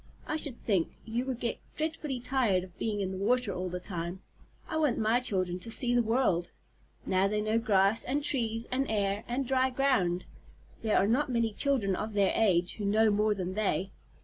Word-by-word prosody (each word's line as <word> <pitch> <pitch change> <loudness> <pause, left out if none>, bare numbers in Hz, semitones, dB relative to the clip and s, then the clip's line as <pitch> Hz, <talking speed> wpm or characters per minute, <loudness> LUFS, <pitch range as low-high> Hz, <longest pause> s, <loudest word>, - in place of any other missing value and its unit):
I - - -2
should 285 -6 0
think 190 -7 0
you 235 +3 -2
would 255 -3 -3
get 235 - -2 0.2
dreadfully 310 -4 -2
tired 240 -7 +1
of 185 -1 -14
being 210 -2 -1
in 190 -1 -2
the 190 - -5
water 250 -2 +1
all 185 0 -3
the 180 +1 -4
time. 175 0 -5 0.4
I 315 - -2
want 300 -6 +2
my 225 +2 +2
children 185 -7 -1
to 230 - -5
see 245 +1 0
the 245 - +4
world. 225 -7 +1 0.6
Now 190 +1 +2
they 210 +1 -1
know 215 +2 +1
grass, 210 -1 +3
and 280 +3 -1
trees, 230 -5 0
and 270 +2 0
air, 205 -1 0
and 255 +3 -1
dry 260 0 +2
ground. 250 -10 +1 0.6
There 220 -2 +2
are - - +4
not 255 +7 +1
many 230 -3 0
children 230 -8 +1
of 215 +3 -4
their 200 -2 +2
age 180 -5 +2
who 210 - -3
know 215 +2 +4
more 210 +1 +2
than 185 -1 -3
they. 195 -2 -1
220 Hz, 200 wpm, -30 LUFS, 195-250 Hz, 0.6 s, the